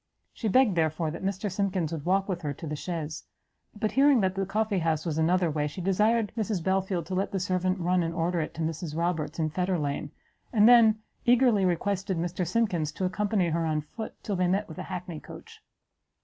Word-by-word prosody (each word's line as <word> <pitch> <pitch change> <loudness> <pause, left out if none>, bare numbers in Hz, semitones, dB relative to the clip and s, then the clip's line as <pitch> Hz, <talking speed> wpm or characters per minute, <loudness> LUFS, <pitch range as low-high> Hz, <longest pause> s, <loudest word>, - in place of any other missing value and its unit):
She 225 - -3
begged, 245 0 +4
therefore, 160 -1 0
that 165 - -7
Mr. 195 +1 -2
Simkins 185 -4 -1
would 160 -3 -5
walk 195 +1 +2
with 180 -3 -3
her 145 -3 -3
to 165 - -8
the 150 -1 -3
chaise; 155 -1 -5 0.6
but 215 - 0
hearing 275 -3 +5
that 190 -1 +1
the 195 -1 -2
coffee 210 -1 0
house 160 -1 0
was 160 -2 -1
another 175 +1 +2
way, 150 0 -1
she 150 +5 -8
desired 210 +4 +2
Mrs 215 -6 -1
Belfield 190 -2 0
to 185 - -6
let 190 +2 -1
the 195 - -1
servant 185 +1 0
run 180 0 +1
and 165 -1 -1
order 170 0 0
it 155 - -5
to 165 - -5
Mrs 160 0 -4
Roberts, 170 -2 -1
in 155 -2 0
Fetterlane, 155 -5 -1 0.4
and 215 -1 +5
then 225 -3 +6 0.2
eagerly 240 -5 +4
requested 190 +1 0
Mr 175 +1 -2
Simkins 180 -7 0
to 190 - -2
accompany 195 -1 0
her 165 +1 0
on 155 -1 0
foot 220 +9 -8
till 205 - -2
they 180 -1 +1
met 195 +4 0
with 160 - -9
an - - -5
hackney 180 -3 -6
coach. - - -12
180 Hz, 210 wpm, -28 LUFS, 165-200 Hz, 0.6 s, then